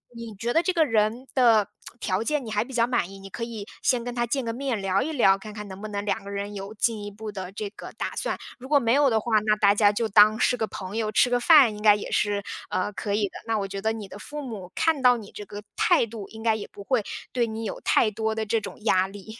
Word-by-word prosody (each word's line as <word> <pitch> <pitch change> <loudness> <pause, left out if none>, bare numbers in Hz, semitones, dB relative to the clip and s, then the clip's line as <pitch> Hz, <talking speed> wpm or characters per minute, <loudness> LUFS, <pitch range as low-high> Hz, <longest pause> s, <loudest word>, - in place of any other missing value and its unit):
你 230 -2 -8
觉 235 +4 -2
得 330 - +4
这 370 - 0
个 330 -3 +3
人 225 +1 +1
的 230 -6 +4 0.3
条 190 +1 -1
件 295 +1 -1
你 220 - -6
还 210 0 +1
比 255 - -12
较 235 -2 +2
满 240 -7 0
意， 195 - -10
你 195 0 -11
可 230 - -5
以 225 -3 -6 0.2
先 250 -2 +1
跟 245 0 -5
他 240 0 -1
见 265 +1 -1
个 230 - -2
面 255 -2 -2
聊 195 0 +1
一 315 - -2
聊， 230 -10 +4
看 215 +2 -9
看 210 0 -7
能 190 0 -9
不 215 - -5
能 205 -1 -4
两 200 -1 -1
个 200 - -9
人 200 +1 -4
有 195 0 -6
进 220 -1 0
一 205 - -5
步 215 +1 -8
的 190 -2 -6
这 210 +1 -5
个 - - -10
打 - - -3
算。 - - -2 0.2
如 260 +2 -10
果 295 - +5
没 235 -3 +2
有 285 0 +4
的 225 -2 +2
话， 220 0 +2
那 210 0 +2
大 200 -1 +4
家 205 0 +4
就 225 +2 -1
当 215 +1 +6
是 250 - +3
个 225 -3 -2
朋 190 +1 -6
友， 215 -2 -1
吃 245 +3 +3
个 245 - +3
饭， 260 -5 +6
应 210 - -9
该 210 -1 +7
也 205 - -6
是， 205 -1 0 0.3
呃， 205 +3 -1
可 200 0 -2
以 210 - 0
的， - - -10
那 225 -1 +1
我 200 -2 -2
觉 195 0 -6
得 220 +2 +1
你 220 -3 -6
的 195 - -11
父 295 +7 -7
母 205 -8 -7
看 320 -4 +1
到 250 -1 +5
你 215 -3 -10
这 210 - -8
个 205 +1 -9
态 - - +3
度， 215 -3 -9
应 220 0 -10
该 225 -1 +3
也 215 - -6
不 200 - -10
会 245 0 +1 0.3
对 240 -2 +1
你 220 0 -5
有 215 - -5
太 215 - +3
多 220 +1 -2
的 220 0 -2
这 220 +1 0
种 200 - -8
压 190 -4 +3
力。 205 +3 -11
220 Hz, 310 characters per minute, -25 LUFS, 205-235 Hz, 0.3 s, 该